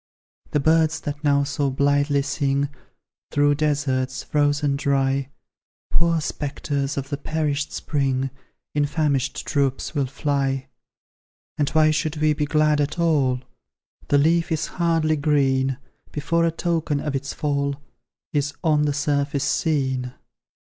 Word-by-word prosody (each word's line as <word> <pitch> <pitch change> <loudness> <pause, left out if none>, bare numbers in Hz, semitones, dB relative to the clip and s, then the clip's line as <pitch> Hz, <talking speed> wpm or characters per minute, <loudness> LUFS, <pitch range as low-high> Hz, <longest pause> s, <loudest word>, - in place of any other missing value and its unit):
"The 150 - +1
birds 160 +1 +3
that 145 +1 -5
now 140 -1 +3
so 140 0 -1
blithely 140 +1 +2
sing, 140 0 0 0.6
Through 145 0 +3
deserts, 140 -3 0
frozen 145 -1 +1
dry, 135 -1 +1 0.6
Poor 170 -1 +2
spectres 140 -2 -3
of 140 0 -3
the 140 - -2
perished 150 -1 -2
spring, 135 -3 -1 0.4
In 145 -1 +2
famished 140 -3 0
troops 140 0 0
will 140 -4 0
fly. 135 -1 -1 0.9
"And 145 - +2
why 155 -1 +4
should 155 0 -1
we 155 0 +3
be 150 0 -1
glad 150 0 +3
at 145 +3 -2
all? 145 -7 +2 0.7
The 145 - +4
leaf 165 +4 +2
is 160 -1 0 0.2
hardly 165 -2 +2
green, 135 -3 +2 0.3
Before 165 +3 +1
a - - +1
token 165 -3 -1
of 145 -1 -3
its 135 0 -3
fall 140 -1 -1 0.6
Is 145 -1 0
on 150 -3 +3
the 145 - +1
surface 140 -1 0
seen!" 130 -4 0
145 Hz, 135 wpm, -23 LUFS, 140-155 Hz, 0.9 s, why